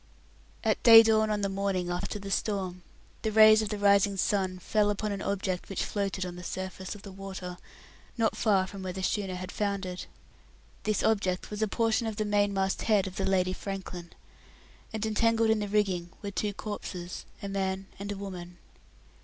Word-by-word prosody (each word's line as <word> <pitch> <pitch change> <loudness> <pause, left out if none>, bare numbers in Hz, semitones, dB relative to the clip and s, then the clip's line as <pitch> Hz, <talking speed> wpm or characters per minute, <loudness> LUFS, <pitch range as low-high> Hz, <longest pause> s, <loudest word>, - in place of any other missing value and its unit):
At - - +1
day 225 -1 +10
dawn 215 -1 +2
the 200 - +1
morning 195 -2 -1
after 175 +4 -3
the 200 -1 -7
storm, 190 -3 -1 0.4
the 220 - -1
rays 215 0 +8
of 215 - -2
the 210 - -2
rising 200 0 +4
sun 190 -1 0
fell 205 +3 +1
upon 205 +1 -1
an 200 -1 -3
object 190 -2 -2
which 195 - -1
floated 195 -2 -2
on 180 -1 -6
the 180 - -8
surface 185 +1 -5
of 205 - -12
the 200 - -9
water 190 -2 -7 0.6
not 225 -1 +2
far 200 -4 +3
from 195 +1 -9
where 185 -1 -4
the 190 0 -5
schooner 195 -1 -1
had 185 +1 -6
foundered. 195 -3 -2 0.8
This 215 -2 +1
object 195 -4 0
was 210 +1 -4
a 220 - +3
portion 225 +2 +1
of 220 - -3
the 215 0 -1
mainmast 205 -2 +1
head 210 -3 +3
of 185 -1 -7
the 195 - 0
Lady 185 -1 +2
Franklin, 185 -3 -6 0.8
and 220 -1 -2
entangled 225 +1 +3
in 220 - +2
the 205 - -2
rigging 190 -4 +1
were 200 - -3
two 205 +1 -1
corpses 185 -5 -6 0.2
a - - -3
man 195 -1 -2
and 200 +1 -4
a 200 - -4
woman. 180 -3 -7
200 Hz, 185 wpm, -29 LUFS, 185-210 Hz, 0.8 s, day